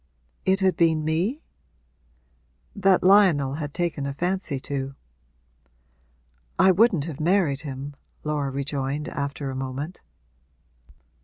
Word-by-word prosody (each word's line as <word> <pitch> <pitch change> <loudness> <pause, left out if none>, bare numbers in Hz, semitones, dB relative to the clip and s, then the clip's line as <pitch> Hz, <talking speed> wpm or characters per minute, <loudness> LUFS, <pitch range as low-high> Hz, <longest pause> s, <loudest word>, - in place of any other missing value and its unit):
'It 190 +1 +3
had 190 -1 +3
been 160 -2 +2
me?' 185 - 0 1.3
'That 195 -2 +3
Lionel 180 -9 +5
had 145 -1 -4
taken 160 -4 -2
a 140 - -4
fancy 175 -4 -2
to.' 135 0 -4 1.6
'I 190 - +6
wouldn't 185 -5 +3
have 160 -5 -6
married 160 -4 +2
him,' 140 -1 -6 0.3
Laura 150 -2 -1
rejoined, 140 +1 -3
after 140 -1 -4
a - - -6
moment. 135 +6 -5
150 Hz, 110 wpm, -25 LUFS, 140-185 Hz, 1.6 s, I